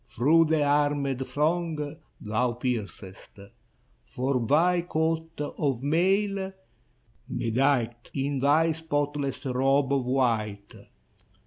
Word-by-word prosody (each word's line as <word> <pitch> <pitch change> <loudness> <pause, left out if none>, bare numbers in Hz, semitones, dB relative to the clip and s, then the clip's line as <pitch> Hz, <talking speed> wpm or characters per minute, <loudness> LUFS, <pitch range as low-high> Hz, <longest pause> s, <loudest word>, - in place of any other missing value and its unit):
Through 160 +8 +3
the 155 -1 +2
armed 145 -2 +1
throng 155 -1 -1 0.2
thou 115 +3 -1
piercest. 110 -7 -5 0.7
For 125 - -2
thy 175 +5 +3
coat 160 -1 -2
of 140 -3 -2
mail, 190 +5 +1 0.8
bedight 120 -1 0
In 140 0 -1
thy 155 +4 +3
spotless 145 -4 -2
robe 135 +2 +2
of 135 -3 0
white. 110 -6 -1
145 Hz, 95 wpm, -27 LUFS, 125-160 Hz, 0.8 s, Through